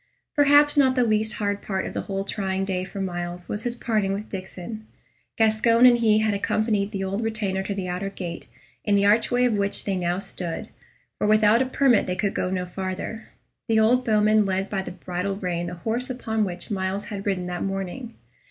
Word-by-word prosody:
Perhaps 290 0 +5
not 260 -2 +4
the 250 - +3
least 215 -1 +1
hard 205 -1 -2
part 190 -2 -2
of - - -5
the - - -2
whole 195 0 -3
trying 195 -1 -2
day 185 -1 -2
for 195 +1 -7
Myles 175 -1 -4
was 210 +3 -3
his 240 0 -1
parting 215 -5 0
with 205 +2 -5
Diccon. 195 +3 -7 0.5
Gascoyne 225 +2 +4
and 240 -1 +7
he 220 -2 +4
had 215 -1 +1
accompanied 210 0 0
the 195 -3 -3
old 195 +3 -2
retainer 210 -4 -1
to 195 +1 -4
the 190 -2 -3
outer 180 +2 -3
gate, 175 -4 -7 0.4
in 205 - +2
the 200 0 +3
archway 235 +4 +3
of 245 - +2
which 200 -1 -1
they 195 - 0
now 175 -1 0
stood; 185 -3 -4 0.5
for - - +1
without 215 +2 +5
a 260 - +1
permit 260 -3 +3
they 180 - -1
could 200 +1 -1
go - - -1
no 185 -1 -2
farther. 190 +4 -5 0.4
The 225 -2 +3
old 245 +4 +4
bowman 215 -1 +4
led 195 0 -2
by 195 -2 0
the - - -6
bridle 180 +2 -4
rein 175 -3 -3
the 180 - -5
horse 230 +8 -2
upon 220 -4 -1
which 180 +2 -6
Myles 190 0 -2
had 200 0 -5
ridden 185 -3 0
that 180 0 -4
morning. 195 +5 -4
200 Hz, 205 wpm, -24 LUFS, 190-220 Hz, 0.5 s, and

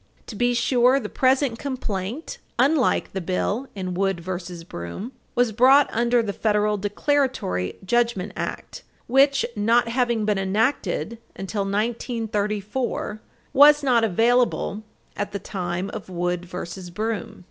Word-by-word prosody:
To 220 - -8
be 245 +3 +1
sure, 250 +2 +3
the 210 -5 -6
present 260 -2 +2
complaint, 245 - -4 0.2
unlike 270 +1 +2
the 190 - -2
bill 200 +8 -1
in 185 -2 -4
Wood 195 0 0
v. 175 -1 -6
Broom, 85 - -6 0.2
was 245 -2 +3
brought 265 +6 +5
under 235 +1 +2
the 205 -2 -3
Federal 210 0 +1
Declaratory 205 - 0
Judgment 235 -3 +1
Act - - -5 0.2
which, 275 +2 +4
not 230 +3 +3
having 235 -3 +1
been 210 -2 +1
enacted 220 +3 0 0.2
until 195 +1 -3
1934, 215 0 -2 0.3
was 295 +2 +7
not 245 -4 +3
available 225 0 +2 0.3
at 205 0 -4
the - - -1
time 185 -1 -4
of 215 -3 -7
Wood 175 0 -2
v. 180 +1 -6
Broom. 215 +4 -4
220 Hz, 130 wpm, -24 LUFS, 195-245 Hz, 0.3 s, was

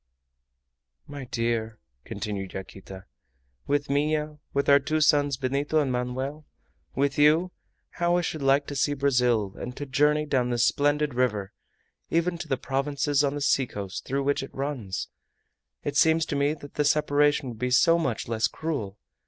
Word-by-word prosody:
"My 145 -2 -8
dear," 115 -2 -2 0.3
continued 100 -3 -5
Yaquita, 95 0 -9 0.6
"with 145 0 0
Minha, 150 +1 0
with 140 0 0
our 140 0 +7
two 155 +3 -1
sons, 145 -2 +3
Benito 140 +4 0
and 140 -3 0
Manoel, 130 +4 -3 0.5
with 140 +1 0
you, 160 +5 +4 0.5
how 175 0 +2
I - - +2
should 160 -3 -4
like 135 +1 +3
to 145 - -6
see 145 +2 +1
Brazil, 125 -7 +1
and 125 +1 -6
to 145 - -4
journey 150 +3 +2
down 130 -4 0
this 120 -1 +2
splendid 145 0 +1
river, 105 -6 -1 0.6
even 170 +1 0
to 170 - -6
the 135 - 0
provinces 140 +2 0
on 140 0 0
the 145 - -4
seacoast 105 -9 -1
through 140 +1 -1
which 140 +1 +1
it 135 - -9
runs! 135 -9 -3 0.8
It - - -3
seems 160 0 +4
to - - -3
me 140 +2 +1
that 145 -2 -12
the 150 - 0
separation 145 -1 +2
would 115 -2 -9
be 125 - -1
so 165 +7 +4
much 130 -9 -2
less 110 -1 +1
cruel! 135 -12 -4
140 Hz, 165 wpm, -26 LUFS, 125-150 Hz, 0.8 s, our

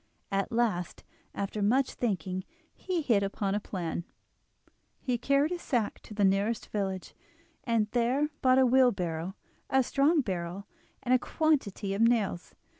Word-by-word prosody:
At 195 0 0
last, 225 -7 -1 0.3
after 200 +1 -3
much 250 +6 +2
thinking, 185 -5 -2 0.3
he 360 -4 -2
hit 225 -7 +3
upon 195 0 -1
a 205 - +1
plan. 175 -4 -4 1.0
He 250 -3 -1
carried 280 +5 +2
his 350 -1 -3
sack 230 -5 -1
to 210 - -12
the 205 -1 +3
nearest 200 +4 +1
village, 190 -3 -3 0.5
and 230 -3 +2
there 255 +5 +1
bought 255 0 +5
a 265 - +6
wheelbarrow, 195 -9 +2 0.3
a 265 0 +4
strong 290 +5 +3
barrel, 185 -2 -4 0.4
and 250 - +2
a 255 - +5
quantity 245 - 0
of 200 - -1
nails. 225 -7 +1
215 Hz, 145 wpm, -29 LUFS, 195-255 Hz, 1.0 s, a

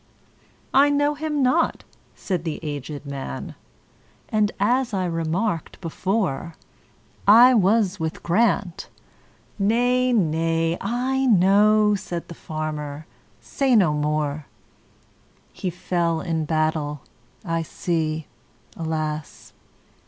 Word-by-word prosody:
"I 280 +2 +6
know 290 +1 +2
him 300 -1 -2
not," 285 +7 +1 0.3
said 180 -4 -3
the 160 -3 -4
aged 145 0 -6
man,"And, 140 - -5
as 240 +2 +1
I 185 -1 0
remarked 165 +2 -2
before,I 195 - +1
was 205 -2 +2
with 160 -1 -4
Grant"—"Nay, 225 +5 -1
nay, 165 -4 +1
I 255 +5 0
know,"Said 205 -2 +3
the - - -7
farmer, 155 -2 -5 0.4
"say 270 -3 +1
no 180 -8 +4
more:"He 150 +4 -6
fell 170 -1 -1
in 160 -1 -2
battle,—I 155 - -3
see, 160 -1 -2 0.5
alas! 155 -2 -4
175 Hz, 85 wpm, -23 LUFS, 155-220 Hz, 0.5 s, I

